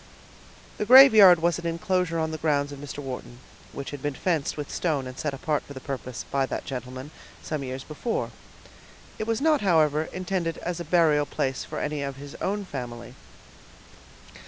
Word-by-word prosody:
The 210 - 0
graveyard 215 -10 +9
was 170 0 +2
an 170 - -4
inclosure 170 0 0
on 160 -1 -1
the 155 - -5
grounds 145 -2 +1
of 140 - -8
Mr. 145 0 -8
Wharton, 125 -2 -7 0.3
which 140 - -6
had 145 -2 -7
been 145 -1 -2
fenced 160 -5 -1
with 145 -1 -5
stone 150 -6 -1
and 130 0 -7
set 150 +2 -2
apart 145 +2 -1
for 140 - -12
the 130 - -7
purpose, 130 -2 -6
by 135 -1 +1
that - - -4
gentleman, 130 +2 -6 0.3
some 155 -3 -3
years 130 0 -5
before. 190 - -3 0.9
It 215 - -3
was 230 +1 0
not, 310 -2 +3
however, 155 -5 +3
intended 180 -2 -3
as 175 0 -4
a - - -3
burial 155 -3 +3
place 130 -1 -2
for - - -7
any 150 -1 -2
of 140 -1 -4
his 140 +1 -10
own 200 +1 -1
family. 120 -6 -7
150 Hz, 180 wpm, -26 LUFS, 135-175 Hz, 0.9 s, graveyard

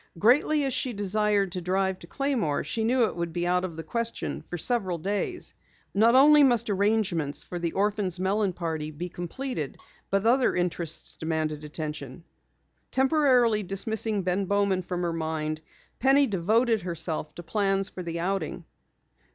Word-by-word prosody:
Greatly 285 - +4
as 270 - -1
she 250 +1 0
desired 205 -1 +1
to 180 - -4
drive 190 +1 0
to 170 - -12
Claymore, 245 - -1
she 225 - -2
knew 245 +2 +3
it - - -4
would 170 -1 -3
be 175 +1 -2
out 180 +1 +2
of 170 -4 -5
the 165 - -5
question 230 +7 -3
for 175 - -3
several 190 -2 0
days. 205 - -3 0.4
Not 225 +4 +5
only 295 +3 +8
must 240 -6 +3
arrangements 195 -7 0
for 175 - -6
the 170 -1 -2
orphans' 200 -3 0
melon 195 +1 +1
party 160 -3 -3
be 165 +4 -6
completed, 175 - -5 0.3
but 195 +2 +1
other 250 +2 +3
interests 175 -2 -1
demanded 155 -2 -2
attention. 150 -2 -6 0.7
Temporarily 260 -6 +3
dismissing 210 +1 -1
Ben 185 +2 0
Bowman 200 -1 +1
from 180 0 -4
her 170 -1 -1
mind, 160 -1 -3 0.4
Penny 270 +2 +5
devoted 220 +3 +2
herself 160 -3 -3
to 175 - -8
plans 195 +2 0
for 185 - -7
the 170 -1 -4
outing. 185 -2 -2
190 Hz, 160 wpm, -27 LUFS, 170-225 Hz, 0.7 s, only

